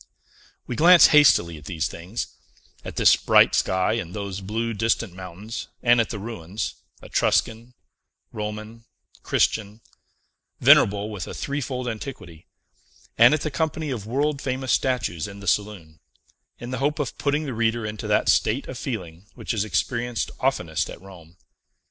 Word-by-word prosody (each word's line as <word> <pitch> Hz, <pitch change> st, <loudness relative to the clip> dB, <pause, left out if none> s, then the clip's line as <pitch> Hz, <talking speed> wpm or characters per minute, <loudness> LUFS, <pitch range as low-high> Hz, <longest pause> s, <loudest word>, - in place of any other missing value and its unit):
We 120 Hz, -, -4 dB
glance 170 Hz, +5 st, +7 dB
hastily 85 Hz, -, +5 dB
at 75 Hz, -, -17 dB
these 80 Hz, -1 st, -2 dB
things, 90 Hz, +8 st, -5 dB, 0.6 s
at -, -, -8 dB
this -, -, +6 dB
bright -, -, +4 dB
sky, 95 Hz, +2 st, +1 dB
and 90 Hz, -6 st, -4 dB
those 100 Hz, -2 st, -5 dB
blue 115 Hz, +4 st, -3 dB
distant 110 Hz, -2 st, -1 dB
mountains, 95 Hz, +5 st, -8 dB, 0.2 s
and 120 Hz, -1 st, +5 dB
at 115 Hz, -, -3 dB
the 110 Hz, -, -4 dB
ruins, 105 Hz, -2 st, -5 dB, 0.3 s
Etruscan, 115 Hz, +2 st, 0 dB, 0.6 s
Roman, 110 Hz, +2 st, -6 dB, 0.4 s
Christian, 105 Hz, 0 st, 0 dB, 0.8 s
venerable 100 Hz, +1 st, +5 dB
with 100 Hz, -4 st, -6 dB
a -, -, -7 dB
threefold 130 Hz, -3 st, -4 dB
antiquity, 110 Hz, -, -7 dB, 0.7 s
and 120 Hz, +6 st, +6 dB
at 155 Hz, -, -4 dB
the 155 Hz, -, -3 dB
company 155 Hz, 0 st, -2 dB
of 110 Hz, -5 st, -5 dB
world 140 Hz, +4 st, -1 dB
famous 130 Hz, 0 st, -2 dB
statues 125 Hz, -, 0 dB
in 100 Hz, 0 st, -10 dB
the 100 Hz, -, -10 dB
saloon, 85 Hz, -4 st, -2 dB, 0.6 s
in 120 Hz, +1 st, -8 dB
the 125 Hz, -, -3 dB
hope 145 Hz, +2 st, 0 dB
of 145 Hz, -5 st, -4 dB
putting 145 Hz, +2 st, 0 dB
the 135 Hz, -, -4 dB
reader 115 Hz, 0 st, 0 dB
into 105 Hz, 0 st, -5 dB
that -, -, +2 dB
state 120 Hz, +6 st, +2 dB
of 130 Hz, -, -7 dB
feeling 95 Hz, -8 st, -6 dB
which -, -, -4 dB
is 105 Hz, -3 st, 0 dB
experienced 120 Hz, +2 st, -2 dB
oftenest 85 Hz, -, -1 dB
at -, -, -9 dB
Rome. 90 Hz, -3 st, -15 dB
110 Hz, 155 wpm, -24 LUFS, 95-125 Hz, 0.8 s, glance